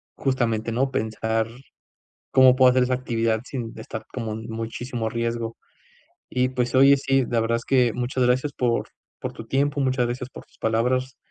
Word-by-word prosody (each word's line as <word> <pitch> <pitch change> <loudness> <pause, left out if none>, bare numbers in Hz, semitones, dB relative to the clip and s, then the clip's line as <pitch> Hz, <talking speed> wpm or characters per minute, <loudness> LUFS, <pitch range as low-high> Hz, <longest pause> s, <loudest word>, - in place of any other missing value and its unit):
justamente, 115 -4 0
¿no? 135 +3 +1
Pensar 110 -1 -1 0.8
cómo 130 -1 +7
puedo 130 -1 +6
hacer 130 0 +3
esa 125 - 0
actividad 115 -3 0
sin 120 -4 -5
estar 110 0 -7
como 115 -4 -3
en 110 +1 -6
muchísimo 115 +1 -4
riesgo. 115 -1 -3 0.7
Y, 125 0 +1
pues, 125 -1 -1
oye, 140 +1 +7
sí, 135 -1 +2
la 115 - +1
verdad 115 +1 +1
es - - -10
que 125 -3 +3
muchas 125 +1 -1
gracias 130 +4 +1
por 120 -3 0 0.3
por - - -4
tu - - -10
tiempo. 145 +2 0
Muchas 130 -2 +1
gracias 125 +1 -4
por - - -11
tus - - -28
palabras. 125 +3 0
125 Hz, 175 wpm, -24 LUFS, 115-130 Hz, 0.8 s, cómo